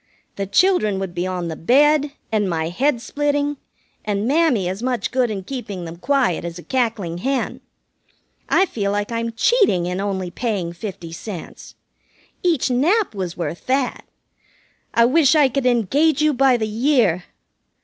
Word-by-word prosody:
The 195 -1 -3
children 215 - +3
would 190 -2 -4
be 175 +1 -2
on 180 -2 -3
the 160 - -4
bed, 290 - +3 0.2
and 210 -3 +1
my 160 -1 -1
head 245 +7 0
splitting, 290 +1 -1 0.5
and 205 +1 -1
Mammy 275 - +2
as 190 +4 -4
much 245 -4 -1
good 250 -2 +1
in 200 -3 -4
keeping 205 -6 -6
them 165 +1 -8
quiet 255 - +1
as 170 0 -6
a 175 - -10
cackling 220 -9 -1
hen. 270 +5 -2 0.9
I 380 - +4
feel 205 - -2
like 205 +2 -2
I'm 230 0 -2
cheating 230 - +2
in 180 +2 -2
only 190 -3 -3
paying 195 -6 -2
fifty 175 -2 -7
cents. 175 +1 -8 0.7
Each 330 -8 +1
nap 345 - +2
was 185 -4 -4
worth 170 -1 -5
that. 260 -1 0 0.9
I 235 - +4
wish 300 +3 +4
I 295 -3 +6
could 260 0 -1
engage 270 - +2
you 305 0 +3
by 260 -1 +4
the 220 -2 -2
year!" 220 - +2
230 Hz, 160 wpm, -21 LUFS, 185-275 Hz, 0.9 s, I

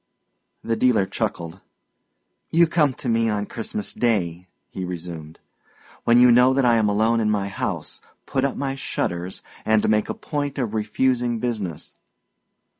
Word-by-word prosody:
The 115 - 0
dealer 120 -5 +3
chuckled. 85 -1 -4 0.9
"You 170 +1 +5
come 155 -5 +2
to 135 - -6
me 115 -1 +2
on 105 -1 -1
Christmas 105 -2 -3
Day," 90 -7 -1 0.2
he 95 - -5
resumed, 85 -3 -7 0.7
"when 120 +1 +5
you 125 0 +7
know 125 +2 +5
that 135 -1 +2
I 120 -1 +4
am 110 -2 +2
alone 110 +3 +2
in 110 -1 +1
my 100 -2 0
house, - - -4 0.2
put 130 - -1
up 140 - 0
my 135 -1 -2
shutters, 90 -8 -3 0.2
and 110 -1 +2
make 105 0 +2
a - - -2
point 145 -1 -4
of 120 -5 -2
refusing 120 +2 0
business. 110 -9 -4
115 Hz, 155 wpm, -23 LUFS, 100-125 Hz, 0.9 s, you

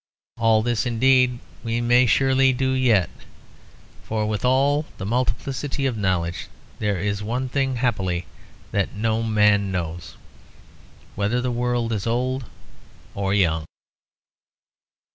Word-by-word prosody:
All 110 -1 +3
this, 120 0 0
indeed, 125 +1 +3 0.3
we 115 0 -1
may 120 +1 +4
surely 135 +2 +3
do 130 +1 0
yet; 120 - +3 0.9
for 110 -1 -2
with 105 -1 -2
all 140 +4 +2
the 95 - -5
multiplicity 130 +4 -2
of 130 -3 0
knowledge 90 -4 -1 0.3
there 105 -2 0
is 100 +2 -2
one 120 +5 -2
thing 135 0 -1
happily 95 -8 -1 0.5
that 100 0 -1
no 110 +1 0
man 105 -3 +3
knows: 85 -7 -5 1.0
whether 105 +5 0
the 125 0 -1
world 120 -1 -1
is 105 0 -3
old 125 +2 -1 0.7
or 100 -1 -2
young. 80 -5 +1
115 Hz, 125 wpm, -23 LUFS, 100-130 Hz, 1.0 s, may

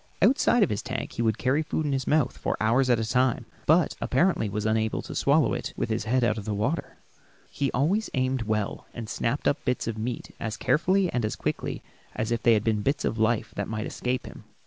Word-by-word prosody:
Outside 240 +1 +4
of 190 - +1
his 105 - -1
tank 130 +1 -4
he - - -4
would 110 -1 +1
carry 130 +6 +1
food 155 0 -2
in 145 - 0
his 135 -1 -2
mouth 150 -3 +2
for - - -2
hours 120 +4 +2
at 120 - +5
a 110 -1 -2
time, 125 0 +1 0.2
but 160 +1 +4
apparently 135 - +2
was 105 +1 -3
unable 110 0 0
to - - -7
swallow 140 -7 +3
it - - -4
with - - -1
his 110 0 -1
head 125 +2 +2
out 110 -1 +1
of 100 - -9
water. 110 +9 -2 0.5
He 140 -2 -1
always 180 - +1
aimed 130 0 0
well, 105 -2 -2
and 115 -2 -5
snapped 115 +4 -1
up 145 +1 +1
bits 125 -1 -1
of 110 -1 -3
meat 120 +2 -4
as 115 -1 -3
carefully 185 +3 +2
and 120 - 0
as 110 - -1
quickly - - -3 0.3
as 110 +1 -2
if 120 0 0
they 115 -2 +5
had 105 - 0
been 110 -2 +1
bits 140 +5 0
of 110 - -1
life 110 0 +1
that 100 - -2
might 110 0 -3
escape 125 0 -2
him. - - -11
125 Hz, 230 wpm, -26 LUFS, 110-140 Hz, 0.5 s, at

